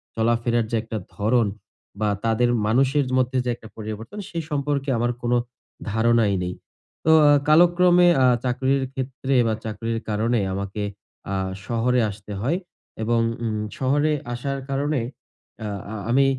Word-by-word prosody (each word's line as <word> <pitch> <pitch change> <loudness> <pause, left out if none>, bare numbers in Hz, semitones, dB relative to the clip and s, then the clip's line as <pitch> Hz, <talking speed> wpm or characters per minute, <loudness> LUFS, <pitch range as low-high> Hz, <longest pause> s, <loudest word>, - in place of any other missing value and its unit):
চলাফেরার 115 0 +1
যে - - +1
একটা 115 -1 -5 0.2
ধরন 110 +2 +2 0.5
বা 105 - +2 0.2
তাদের 115 +2 +2 0.2
মানুষের 135 +4 +3
মধ্যে 130 0 +1
যে - - 0
একটা 110 - -13
পরিবর্তন, 110 - -6
সেই 165 -1 -3
সম্পর্কে 140 -1 -1
আমার 120 +1 +1
কোনো 120 0 +2 0.5
ধারণাই 110 -1 +3
নেই। 90 0 -3 0.5
তো 160 - +5 0.2
আ - - +7 0.2
কালক্রমে 175 +2 +6 0.2
আ - - +6 0.2
চাকরির 130 +2 +1
ক্ষেত্রে 130 +1 -2
বা 110 - +1
চাকরির 115 +1 -3
কারণে 115 +3 +1
আমাকে 100 +1 -3 0.5
আ - - 0 0.3
শহরে 120 +2 +1
আসতে 105 +1 -9
হয় 150 - +1 0.5
এবং 115 +1 +2 0.2
উম 110 -2 -1 0.2
শহরে 145 +3 +2 0.2
আসার 140 +3 -3
কারণে 145 +1 0 0.7
আ - - -2 0.3
আ - - -4
আমি 135 +3 +4
120 Hz, 145 wpm, -23 LUFS, 110-140 Hz, 0.7 s, আ